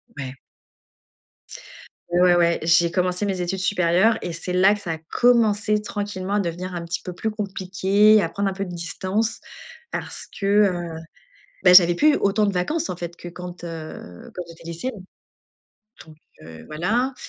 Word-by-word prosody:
Ouais. 135 -1 -7 1.7
Ouais, 175 0 +4
ouais, 170 -1 +3
j'ai 170 +1 +4
commencé 180 +2 0
mes 190 -2 -2
études 180 +2 -2
supérieures 185 +3 +2
et 175 - -4
c'est 175 +2 -5
là 190 +3 +5
que 210 - -5
ça 175 -5 -5
a 160 - -3
commencé 210 +3 +2
tranquillement 205 -2 -4
à - - +2
devenir 180 0 -4
un 170 -1 -5
petit 170 - -4
peu 180 - -5
plus 220 +5 -3
compliqué, 200 +1 +2
à 165 - -1
prendre 200 +3 -2
un 195 - -1
peu 195 +1 -4
de 180 -2 -7
distance 190 +6 -2 0.5
parce - - -5
que, 195 - -3
heu, 185 -5 +2 0.7
bah, 180 0 +7
j'avais 175 -2 +8
plus 300 - +4
autant 205 +1 +1
de 200 - 0
vacances, 300 - -1
en 180 - -4
fait, 175 -1 -6
que 175 - -9
quand, 180 0 -9
heu, 155 - -9
quand 180 - -4
j'étais 165 0 -14
lycéenne. 185 +5 -6 1.0
Donc, 155 - -14 0.3
heu, 80 0 -12
voilà, 225 - -1
185 Hz, 170 wpm, -23 LUFS, 170-205 Hz, 1.7 s, j'avais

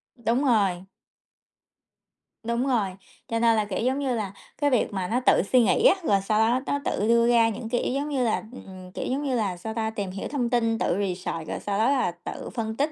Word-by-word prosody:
Đúng 235 +3 0
rồi. 195 -7 +2 1.6
Đúng 235 +3 -1
rồi, 220 -7 +1 0.4
cho 230 0 -1
nên 230 -1 +4
là, 215 -1 +1
kiểu 200 - -3
giống 260 +2 +1
như 265 -4 0
là, 205 -4 -3 0.3
cái 290 -1 +2
việc 250 -5 +1
mà 190 -2 -2
nó 235 +6 +1
tự - - +5
suy 255 - +6
nghĩ 445 - +2
á, - - +7
rồi 200 -8 +2
sau 215 +2 0
đó 235 +3 +3
nó 285 - -1
tự 210 - 0
đưa 235 0 +4
ra 230 -1 +4
những 225 +1 -5
cái 245 0 0
ý - - -1
giống 285 +2 -2
như 265 -3 0
là, 225 - 0
ừm, 185 -6 -11
kiểu - - -5
giống 275 +3 -2
như 265 -3 0
là, 200 -6 -1
sao 220 +5 -6
ta, 220 -1 -1
tìm 205 -4 -4
hiểu 195 - -5
thông 255 -4 -1
tin, 230 -2 +1
tự 175 - 0
research, 180 -4 -3
rồi - - -3
sau 200 0 -2
đó 230 - +3
là 265 -10 +1
tự 175 +1 -8
phân 220 -2 -4
tích 290 +3 +1
230 Hz, 240 wpm, -25 LUFS, 200-255 Hz, 1.6 s, á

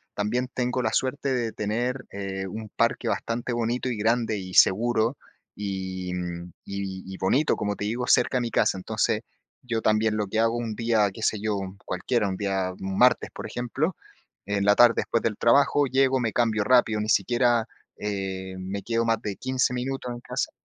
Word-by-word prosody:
también 115 +5 -1
tengo 125 0 0
la 110 -2 0
suerte 135 +1 0
de 120 -3 -1
tener, 120 +5 -2
eh, 95 -1 -4
un 110 +2 -7
parque - - +1
bastante 120 +1 -2
bonito, 120 +2 -1
y 120 - -1
grande, 115 0 +1
y 95 -1 -7
seguro 115 +4 +4 0.4
y 95 -2 -4 0.5
y 100 -1 -5
y - - -9
bonito, 130 +12 +2
como 105 0 -2
te 105 - -4
digo, 120 +4 -2
cerca 125 +1 +4
a - - +1
mi 120 -1 -3
casa. - - +2
Entonces, 110 +3 0 0.4
yo 120 -3 -2
también 110 0 +2
lo 105 -1 -1
que 110 - -3
hago 115 +1 +2
un 115 -2 -3
día, 115 -3 +2
qué 110 - -9
sé 110 - +1
yo, 105 -1 0 0.3
cualquiera, 105 +4 0
un 95 - -3
día 95 -2 -1
martes, 95 +6 +2
por - - -7
ejemplo, 135 +8 -2 0.5
en 100 0 -1
la 105 - +5
tarde, 120 0 +7
después 115 - 0
del 110 -2 0
trabajo, 140 +3 +4
llego, 130 0 +3
me 115 -3 0
cambio 110 -2 +2
rápido, 110 -2 +3
ni 105 - -3
siquiera, 120 +3 +3 0.3
eh, 95 -2 -4
me 95 +2 -4
quedo 115 0 0
más 115 -1 +1
de 105 -4 -4
15 130 -1 0
minutos 125 0 -3
en 120 - -7
casa. - - -3
110 Hz, 185 wpm, -26 LUFS, 100-120 Hz, 0.5 s, tarde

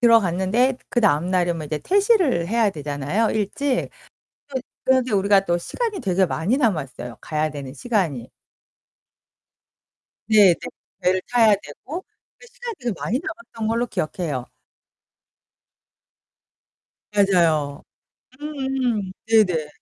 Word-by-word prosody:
들어갔는데 230 +2 +3
그다음 180 - +2
날이면 175 -4 0
이제 150 0 -2
퇴실을 375 - +2
해야 225 -2 +2
되잖아요, 150 +7 -1
일찍. 250 +6 -1 0.6
또 270 -2 -2 0.3
그런데 260 -2 +2
우리가 200 0 +4
또 175 -1 +1
시간이 440 - -3
되게 190 -4 +2
많이 185 +11 0
남았어요. 135 - -2
가야 155 0 -1
되는 140 -2 -7
시간이. 170 - -1 2.0
네네, 205 -5 +7 0.5
배를 185 0 +2
타야 225 -4 +5
되고 270 - -8 0.3
그 - - -15
시간이 475 -1 -7
되게 245 -4 -2
많이 250 +7 -1
남았던 330 -12 -5
걸로 230 +2 +1
기억해요. 155 - -3 2.7
맞아요. 165 -8 +2 0.6
음음음. 265 -9 -2
네네. 185 -9 +3
205 Hz, 250 characters per minute, -22 LUFS, 165-245 Hz, 2.7 s, 네네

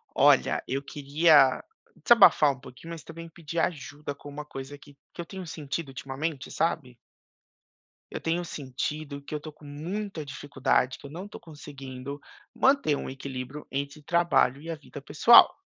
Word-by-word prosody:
Olha, - - +4
eu 135 +1 -1
queria 145 -1 +4 0.4
desabafar 195 -10 +7
um 135 - -12
pouquinho, 135 +5 -12
mas 165 -2 -8
também 165 0 -10
pedir 165 0 -7
ajuda 145 -3 -3
com 145 - -12
uma 145 +1 -7
coisa 135 -1 -8
que 145 0 -17 0.2
que - - -7
eu 170 - -6
tenho 190 -1 -8
sentido 155 0 -5
ultimamente, 135 +2 -5
sabe? 140 -7 -1 1.2
Eu - - -4
tenho 170 +2 -1
sentido 140 0 -5
que 140 - -8
eu - - -1
estou 155 +1 -9
com 150 0 -19
muita 170 +5 -5
dificuldade, 135 -2 -1
que - - -11
eu - - -11
não 175 +5 -7
estou 205 - -10
conseguindo 140 -3 -9 0.3
manter 270 - +3
um - - -4
equilíbrio 135 +1 -7
entre 140 +2 -4
trabalho 170 -5 +2
e 165 - -10
a 165 - -3
vida 150 -1 -11
pessoal, 150 +12 +7
145 Hz, 165 wpm, -27 LUFS, 140-165 Hz, 1.2 s, desabafar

